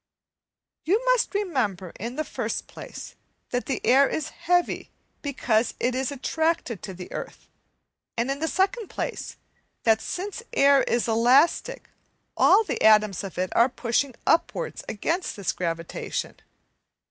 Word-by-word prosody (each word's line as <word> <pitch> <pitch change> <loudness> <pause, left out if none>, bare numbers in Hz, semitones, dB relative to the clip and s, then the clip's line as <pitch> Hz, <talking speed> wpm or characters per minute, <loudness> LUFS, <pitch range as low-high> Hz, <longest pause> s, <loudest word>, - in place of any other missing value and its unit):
you 415 +10 +1
must - - +2
remember, 245 - -1
in 235 +4 -5
the 310 - -1
first - - -3
place, - - -9 0.4
that 245 0 -2
the 270 - -1
air 270 +2 +5
is 315 0 -2
heavy 350 +1 0 0.3
because 245 -5 0
it 245 +1 +1
is 260 +2 -1
attracted 300 - -1
to 195 - -6
the 180 -1 -9
earth, - - -7 0.7
and 235 +4 0
in 275 - -3
the 320 - -1
second 395 +6 0
place, - - -5 0.5
that 220 -1 +4
since 400 +5 -4
air 280 0 +5
is 240 0 0
elastic 245 +8 +3 0.5
all 445 - +6
the - - -4
atoms 215 -4 +5
of 195 -3 -7
it 185 0 -2
are 235 +3 +5
pushing 250 +1 -1
upwards 345 +9 0
against 330 - -2
this 200 -4 -1
gravitation. 165 -2 -3
265 Hz, 140 wpm, -25 LUFS, 220-335 Hz, 0.7 s, all